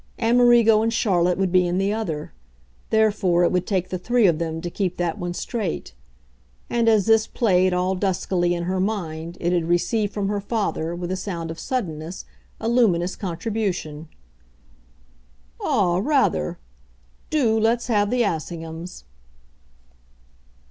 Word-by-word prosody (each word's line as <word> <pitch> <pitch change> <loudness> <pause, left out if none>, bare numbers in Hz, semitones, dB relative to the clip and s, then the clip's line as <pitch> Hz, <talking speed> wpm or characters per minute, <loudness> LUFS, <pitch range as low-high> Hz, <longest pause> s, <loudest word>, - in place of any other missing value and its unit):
Amerigo 235 -2 +5
and 225 +1 +1
Charlotte 180 -6 +1
would 190 -2 0
be 180 -1 +4
in 175 +1 -1
the 195 +2 +1
other; 165 -9 -4 0.6
therefore 210 -5 +2
it 175 - +3
would 180 0 0
take 185 -3 -1
the 185 - -3
three 240 +4 +2
of 165 -4 +3
them 160 -1 -3
to 175 - -5
keep 180 -2 -2
that 175 -2 -2
one 175 0 -4
straight. 200 - -4 0.8
And 235 -1 +3
as 215 -3 +3
this 220 -1 +4
played, 185 -5 +2
all 180 +1 0
duskily, 180 -2 0
in 170 - -3
her 185 +2 -1
mind 170 -5 -3
it 175 +1 0
had 170 -2 +1
received 205 +5 +1
from 200 -1 -2
her 205 0 -1
father, 195 -6 -2
with 175 +1 -5
a - - 0
sound 175 -4 -5
of 165 - -8
suddenness, 175 -8 -4 0.3
a 225 - -3
luminous 195 -7 +2
contribution. 180 -5 -3 1.5
"Ah, 175 -3 +1
rather! 210 - +1 0.7
DO 235 -8 +2
let's 230 +2 +1
have 205 -4 +1
the 245 +1 +2
Assinghams." 165 - -5
185 Hz, 150 wpm, -23 LUFS, 175-220 Hz, 1.5 s, Amerigo